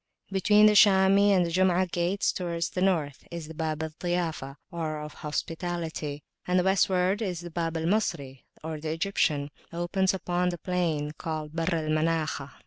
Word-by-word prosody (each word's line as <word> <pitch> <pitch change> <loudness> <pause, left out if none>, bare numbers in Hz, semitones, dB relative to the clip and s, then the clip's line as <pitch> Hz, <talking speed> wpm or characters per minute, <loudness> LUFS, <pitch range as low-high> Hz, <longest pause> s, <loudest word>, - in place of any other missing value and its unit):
Between 210 +2 +5
the 215 - +6
Shami 200 0 +6
and 185 -3 +4
the 170 - -3
Jum'ah 185 +1 +3
gates, 175 +3 +1
towards 170 -2 -3
the 180 - -3
North, 160 -7 0
is 170 -2 -6
the 160 - -8
Bab 160 -1 -2
al 160 - -3
Ziyafah 165 -5 -3 0.2
(of 155 -3 -4
Hospitality); 160 -1 -4 0.2
and 180 0 +3
Westwards 190 0 +1
the 175 -1 -8
Bab 165 0 -2
al 160 - -3
Misri 165 -9 -1 0.2
(Egyptian) 155 -1 -1 0.2
opens 180 +3 0
upon 180 -1 0
the 175 - -4
plain 165 -5 -1
called 155 -3 -4
the - - -9
Barr 175 0 +1
al 155 - -4
Manakhah. 155 -3 0
170 Hz, 155 wpm, -27 LUFS, 155-185 Hz, 0.2 s, the